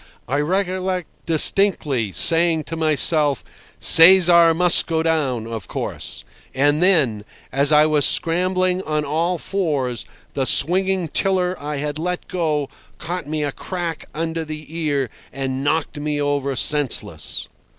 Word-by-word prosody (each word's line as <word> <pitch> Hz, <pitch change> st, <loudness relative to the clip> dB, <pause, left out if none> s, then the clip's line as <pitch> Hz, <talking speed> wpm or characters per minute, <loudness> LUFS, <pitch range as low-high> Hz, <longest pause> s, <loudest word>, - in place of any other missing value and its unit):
I 140 Hz, +4 st, -1 dB
recollect 185 Hz, +2 st, -2 dB, 0.2 s
distinctly 155 Hz, -, +2 dB
saying 165 Hz, -, +4 dB
to 165 Hz, -, -7 dB
myself, 155 Hz, -2 st, +2 dB, 0.4 s
"Cesar 170 Hz, -1 st, +7 dB
must 175 Hz, 0 st, +3 dB
go 160 Hz, -1 st, -1 dB
down, 140 Hz, -8 st, -1 dB
of 115 Hz, -3 st, -7 dB
course," -, -, -6 dB, 0.3 s
and 145 Hz, +3 st, +1 dB
then, 145 Hz, -, +2 dB, 0.3 s
as 140 Hz, +2 st, +2 dB
I 150 Hz, 0 st, +5 dB
was 155 Hz, -2 st, +1 dB
scrambling 185 Hz, +4 st, 0 dB
on 150 Hz, -3 st, -3 dB
all 165 Hz, +5 st, -1 dB
fours, 145 Hz, -, -3 dB, 0.3 s
the 135 Hz, -, -1 dB
swinging 185 Hz, +4 st, +1 dB
tiller 185 Hz, +2 st, 0 dB
I 150 Hz, 0 st, -5 dB
had 150 Hz, +1 st, -3 dB
let 180 Hz, +2 st, -4 dB
go 155 Hz, -5 st, -2 dB, 0.3 s
caught 175 Hz, -2 st, -6 dB
me 155 Hz, 0 st, -2 dB
a 145 Hz, -, -2 dB
crack 175 Hz, 0 st, -6 dB
under 165 Hz, +1 st, -4 dB
the 155 Hz, 0 st, -9 dB
ear, 145 Hz, -6 st, -1 dB, 0.2 s
and 135 Hz, 0 st, -4 dB
knocked 145 Hz, 0 st, -2 dB
me 150 Hz, 0 st, -3 dB
over 145 Hz, -1 st, -1 dB
senseless. 145 Hz, +1 st, -1 dB
155 Hz, 135 wpm, -20 LUFS, 145-175 Hz, 0.4 s, Cesar